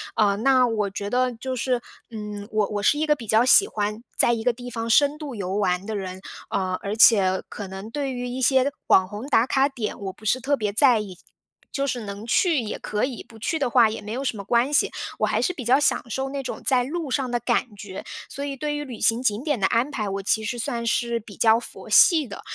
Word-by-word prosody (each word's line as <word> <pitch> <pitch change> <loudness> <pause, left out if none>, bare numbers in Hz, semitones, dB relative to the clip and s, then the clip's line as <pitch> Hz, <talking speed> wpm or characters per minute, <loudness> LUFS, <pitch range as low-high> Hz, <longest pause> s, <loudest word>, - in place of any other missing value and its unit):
呃， 200 -2 +2
那 255 +2 +4
我 215 -3 -1
觉 200 +1 -5
得 250 +1 +1
就 255 +3 -5
是， 250 0 -1 0.3
嗯， 210 -2 -7
我 215 -2 +1
我 205 -1 -3
是 295 - +3
一 310 - +1
个 300 -1 +3
比 230 -5 -10
较 220 +3 +4
喜 400 +10 +6
欢 210 +2 -3
在 235 - +4
一 225 -1 -3
个 245 -1 +2
地 245 +1 -9
方 230 0 -4
深 285 +5 +4
度 290 -6 -7
游 190 -1 -3
玩 185 -1 0
的 220 -1 -4
人。 190 -1 -6 0.3
呃， 185 -2 -1
而 205 +2 -4
且 195 -5 +5
可 205 - -7
能 195 +3 -8
对 275 +2 -3
于 245 -1 -4
一 255 +1 -5
些 265 +2 +3
网 185 -1 +5
红 210 +5 -7
打 240 -4 +3
卡 270 +2 +2
点， 235 -6 -5
我 195 -2 -5
不 215 - -17
是 250 +4 +1
特 280 +2 0
别 210 -2 -2
在 245 -1 +5
意， 190 -4 -7 0.5
就 275 0 -1
是 245 -3 -2
能 200 +1 -7
去 330 +1 +3
也 220 -3 -4
可 210 +3 -2
以， 260 -3 -6
不 225 - -15
去 320 +9 -1
的 270 -4 0
话 235 -2 +5
也 215 - -6
没 210 - -8
有 250 +4 -3
什 255 -4 -2
么 200 - -6
关 240 +7 +1
系。 - - +3 0.3
我 215 - +2
还 215 +2 0
是 360 - 0
比 275 -8 -7
较 255 +4 +4
享 - - +2
受 265 +3 -2
那 275 -1 -4
种 255 - -6
在 250 -2 +3
路 310 +2 -4
上 255 -2 -1
的 240 - 0
感 235 -1 -1
觉。 195 -2 -8 0.3
所 280 -1 -6
以 280 -1 -4
对 295 +2 -2
于 295 - -3
旅 250 -6 -9
行 235 +2 +2
景 215 +1 0
点 290 -5 +1
的 190 - +2
安 235 +4 +1
排， 210 -5 -3
我 195 0 -3
其 220 +2 0
实 235 +3 -3
算 235 +1 -3
是 235 -1 0
比 205 -2 -13
较 225 0 +5
佛 - - -10
系 315 -7 +6
的。 200 - -9
235 Hz, 275 characters per minute, -24 LUFS, 210-265 Hz, 0.5 s, 喜